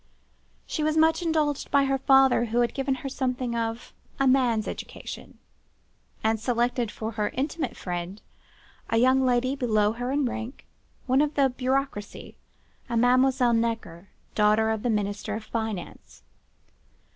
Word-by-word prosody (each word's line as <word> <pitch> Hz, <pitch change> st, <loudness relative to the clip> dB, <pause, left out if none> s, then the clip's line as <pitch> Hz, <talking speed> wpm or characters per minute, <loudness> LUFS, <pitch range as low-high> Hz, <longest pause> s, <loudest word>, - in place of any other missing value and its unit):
She -, -, -3 dB
was 310 Hz, +1 st, +1 dB
much 320 Hz, +2 st, +4 dB
indulged 310 Hz, -4 st, 0 dB
by 280 Hz, -1 st, +4 dB
her 270 Hz, 0 st, 0 dB
father, 270 Hz, -2 st, +5 dB
who 235 Hz, +1 st, +1 dB
had 240 Hz, -, 0 dB
given 270 Hz, -1 st, -1 dB
her -, -, 0 dB
something 255 Hz, -2 st, -2 dB
of 230 Hz, 0 st, -3 dB, 0.3 s
a 275 Hz, -, +3 dB
man's 250 Hz, -4 st, +3 dB
education, -, -, -8 dB, 0.9 s
and 220 Hz, 0 st, +1 dB
selected 240 Hz, 0 st, 0 dB
for 220 Hz, +1 st, -5 dB
her 210 Hz, -2 st, -1 dB
intimate 295 Hz, +5 st, -2 dB
friend 180 Hz, +2 st, -5 dB, 0.7 s
a 225 Hz, -, +1 dB
young 260 Hz, +3 st, +4 dB
lady 255 Hz, +1 st, +1 dB
below 215 Hz, -6 st, +2 dB
her 245 Hz, +3 st, -4 dB
in 285 Hz, 0 st, +1 dB
rank, 240 Hz, +1 st, -5 dB, 0.4 s
one 265 Hz, +1 st, +3 dB
of 300 Hz, 0 st, 0 dB
the 275 Hz, -2 st, +3 dB
Bureaucracie, 255 Hz, -4 st, -3 dB, 0.5 s
a 235 Hz, -, 0 dB
Mademoiselle 250 Hz, +1 st, +3 dB
Necker, 225 Hz, -6 st, -2 dB, 0.2 s
daughter 215 Hz, +1 st, +3 dB
of 220 Hz, -1 st, -2 dB
the 245 Hz, -, -1 dB
Minister 210 Hz, 0 st, -2 dB
of 220 Hz, -, -5 dB
Finance. 220 Hz, -4 st, -6 dB
245 Hz, 145 wpm, -26 LUFS, 220-270 Hz, 0.9 s, father